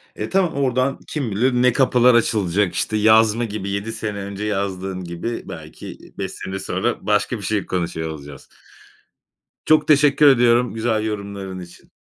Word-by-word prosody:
E, - - -5
tamam, 190 -3 +1
oradan 135 -1 0
kim 135 -8 -3
bilir 125 +6 +1
ne 125 0 +3
kapılar 125 -2 +4
açılacak, 100 -4 +1
işte, 110 - -1
yazma 110 +2 +4
gibi, 100 -2 -5
7 100 +3 -3
sene 105 -2 -4
önce 100 +1 -6
yazdığın 95 -2 -3
gibi, 85 +7 -5
belki 80 -2 -9 0.2
5 - - -4
sene 95 0 -6
sonra 95 - -2
başka 105 +3 +1
bir 100 - -10
şey 105 0 -1
konuşuyor 80 -3 -3
olacağız. 70 -3 -10 1.2
Çok 155 0 +3
teşekkür 145 -1 +5
ediyorum 120 -2 +4
güzel 110 -1 -1
yorumların 100 -3 -5
için. 90 -1 -13
105 Hz, 155 wpm, -21 LUFS, 95-125 Hz, 1.2 s, teşekkür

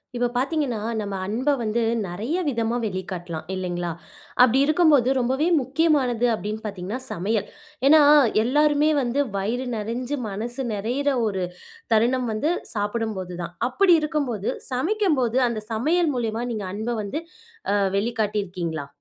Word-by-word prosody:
இப்போ 245 0 +1
பார்த்தீங்கன்னா, 270 -3 0 0.2
நம்ம 200 -1 -4
அன்பை 245 +9 0
வந்து 225 +1 0 0.3
நெறைய 220 - -3
விதமா 235 -3 0
வெளிக்காட்டலாம், 180 -5 -5
இல்லைங்களா? 175 -2 -3 0.5
அப்படி 250 +1 +6
இருக்கும்போது, 305 -5 +4
ரொம்பவே 265 +6 +1
முக்கியமானது 265 -3 +1
அப்படீன்னு 215 0 -4
பார்த்தீங்கன்னா 200 +3 -4
சமையல். 205 +3 -1 0.4
ஏன்னா, 310 +2 +8 0.4
எல்லாருமே 295 +4 +3
வந்து 255 +3 0 0.2
வயிறு 235 +6 -2
நெறைஞ்சு, 240 +6 -3
மனசு 240 +6 -4
நெறையிற 245 +8 0 0.2
ஒரு 190 -3 -2 0.5
தருணம் 245 +3 +2
வந்து 255 +10 0 0.2
சாப்பிடும்போது 205 -4 -3
தான். 170 +1 -8
அப்படி 360 +6 +5
இருக்கும்போது 285 - -1 0.2
சமைக்கும்போது, 265 - +1
அந்த 220 -2 -3
சமையல் 310 +8 +2
மூலியமா, 230 -1 -2
நீங்க 210 -3 -4
அன்பை 220 +3 -2
வந்து 205 +11 -4 0.5
அ - - +3 0.2
வெளிக்காட்டியிருக்கீங்களா? 200 - -2
235 Hz, 125 wpm, -24 LUFS, 205-275 Hz, 0.5 s, ஏன்னா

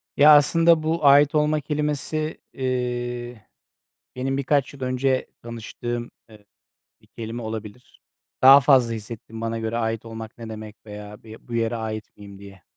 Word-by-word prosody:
Ya, 150 +1 +8
aslında 165 +2 +4
bu 160 0 -1
ait 145 +2 +6
olma 150 0 +2
kelimesi, 150 +1 -2
iii, 120 -2 -3 0.8
benim 135 +1 -2
birkaç 140 0 0
yıl 135 - -14
önce 130 0 0 0.2
tanıştığım, 120 +1 -6 0.2
ııı, 105 -1 -17 0.6
bir - - -24
kelime 115 +1 -7
olabilir. 110 +1 -8 0.4
Daha 135 +2 +10
fazla 125 -3 +4
hissettim 110 0 -8
bana 115 0 -3
göre 110 +1 -3
ait 115 -1 -2
olmak 115 -1 -9
ne 115 -1 -8
demek 110 -1 -8
veya 105 0 -10
bir, 110 +2 -14
bu 120 - -6
yere 115 0 0
ait 110 -1 -6
miyim, 100 -1 -12
diye. 100 -2 -14
120 Hz, 150 wpm, -23 LUFS, 110-140 Hz, 0.8 s, Daha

